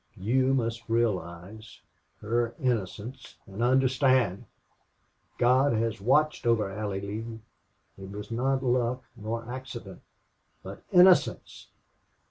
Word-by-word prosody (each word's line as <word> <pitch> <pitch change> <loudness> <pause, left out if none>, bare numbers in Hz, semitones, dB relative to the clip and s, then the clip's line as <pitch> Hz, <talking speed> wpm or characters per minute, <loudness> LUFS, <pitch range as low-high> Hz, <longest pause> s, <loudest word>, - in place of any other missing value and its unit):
You 130 +7 +1
must 115 -2 -3
realize 105 -2 -3 0.4
her 115 +2 -1
innocence 120 0 -3
and 100 +3 -8
understand. 130 -4 +2 0.9
God 130 +2 +3
has 115 -2 -1
watched 150 +4 +2
over 110 -4 +2
Allie 100 -1 -4
Lee! 110 +3 -6 0.6
It 95 0 -9
was 105 +2 -8
not 130 +3 0
luck 125 0 0
nor 115 +1 -5
accident. 120 -6 -8 0.6
But - - -9
innocence!... 180 0 +4
115 Hz, 100 wpm, -28 LUFS, 105-130 Hz, 0.9 s, innocence